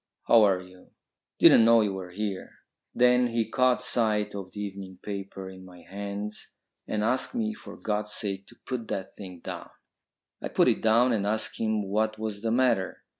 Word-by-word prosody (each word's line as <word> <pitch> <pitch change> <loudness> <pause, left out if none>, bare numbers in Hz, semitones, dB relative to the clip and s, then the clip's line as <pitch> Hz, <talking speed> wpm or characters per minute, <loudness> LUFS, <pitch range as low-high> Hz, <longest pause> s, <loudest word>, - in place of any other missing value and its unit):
How 115 - +6
are 95 -3 +4
you! 90 0 -16 0.5
Didn't - - +7
know 115 0 +6
you 105 -2 0
were 95 -2 -6
here." 100 +1 -5 0.4
Then 125 0 +4
he 115 -1 -1
caught 125 +2 +2
sight 105 -3 +1
of 95 -2 -7
the 105 - -8
evening 95 -2 -6
paper 100 -2 -6
in 95 0 -11
my 90 -1 -14
hands 100 +2 -6 0.3
and 105 -1 -1
asked 130 - 0
me 220 -2 -1
for - - -11
God's 105 -1 -2
sake 100 -2 -3
to 120 - -16
put 125 -4 -4
that 95 - -5
thing 90 -4 -10
down. - - -7 0.7
I - - -3
put - - +3
it - - 0
down 115 +3 +4
and 100 -2 0
asked 110 +1 -2
him 110 -1 0
what 110 +2 0
was 110 -2 -4
the 115 - -1
matter. 120 -6 +1
105 Hz, 185 wpm, -27 LUFS, 95-115 Hz, 0.7 s, Didn't